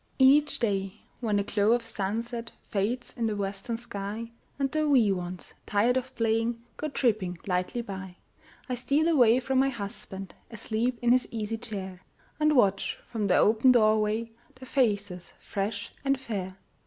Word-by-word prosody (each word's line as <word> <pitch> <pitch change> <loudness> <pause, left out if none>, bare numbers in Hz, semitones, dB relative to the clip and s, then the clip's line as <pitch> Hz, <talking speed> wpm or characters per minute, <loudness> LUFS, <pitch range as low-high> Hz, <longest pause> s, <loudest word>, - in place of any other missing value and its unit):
Each 285 +3 +5
day, 195 -3 -1 0.2
when 220 -4 0
the 200 - +2
glow 205 +2 +2
of 240 -1 0
sunset 230 +4 -3
Fades 225 +4 -2
in 230 -1 0
the 215 - -1
western 200 +3 -3
sky, 220 0 -6 0.3
And 275 -1 0
the 310 -1 +1
wee 240 -8 +5
ones, 180 -1 -5
tired 220 +4 +3
of 260 0 -3
playing, 230 +1 +1 0.2
Go 305 - -2
tripping 215 - 0
lightly 185 +5 -1
by, 190 -3 -7 0.5
I 255 - -2
steal 280 +6 +1
away 250 -7 +5
from 260 +1 +1
my 270 +1 +4
husband, 200 -4 -6 0.2
Asleep 230 +2 -1
in 240 - +4
his 255 0 +4
easy 225 0 -3
chair, 190 -5 -6 0.4
And 305 0 +3
watch 200 -6 +2
from 220 -4 -1
the 185 - +4
open 225 +4 +5
door 215 -2 +4
way 220 +2 -1 0.2
Their 255 0 -11
faces 205 -9 0
fresh 200 +1 -3
and 275 -1 +1
fair. 195 -7 -5
225 Hz, 165 wpm, -28 LUFS, 200-250 Hz, 0.5 s, Each